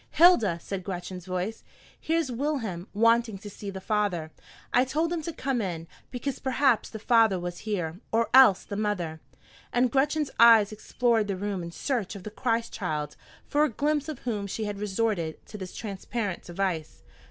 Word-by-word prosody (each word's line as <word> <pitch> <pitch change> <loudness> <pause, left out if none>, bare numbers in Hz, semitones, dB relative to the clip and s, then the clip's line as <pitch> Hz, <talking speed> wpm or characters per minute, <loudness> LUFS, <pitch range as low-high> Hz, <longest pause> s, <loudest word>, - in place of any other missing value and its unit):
"Hilda," 300 - +5
said 195 -2 -4
Gretchen's 180 -1 -6
voice, 185 +4 -3 0.4
"here's 325 -4 0
Wilhelm 230 - -2
wanting 230 0 +3
to 205 +2 -10
see 200 +1 -7
the 195 -1 -6
father. 190 -6 -1 0.4
I 250 - +5
told 315 +6 0
him 335 - -2
to 335 - -4
come 270 -5 -1
in, 170 -4 -4 0.2
because 265 +1 -4
perhaps 265 -2 +2
the 220 - -7
father 220 -3 +4
was 175 0 -5
here, 175 -4 -2
or 230 +1 +1
else 255 -8 +7
the 200 - -6
mother." 180 -7 -2 0.5
And 245 0 +2
Gretchen's 290 +1 +1
eyes 225 -3 +7
explored 225 0 +1
the 195 -2 -2
room 200 -1 -3
in 170 - -5
search 230 0 -2
of 195 - -9
the 215 - -7
Christ 230 +1 -1
child, 150 -6 -3 0.3
for 295 +1 +2
a 305 - +3
glimpse 295 +4 0
of 305 - -4
whom 210 -5 -2
she 215 +3 -3
had 205 -1 -4
resorted 200 -5 -1
to - - -12
this 185 -3 -7
transparent 205 -1 -4
device. 175 -3 -3
215 Hz, 175 wpm, -27 LUFS, 185-250 Hz, 0.5 s, else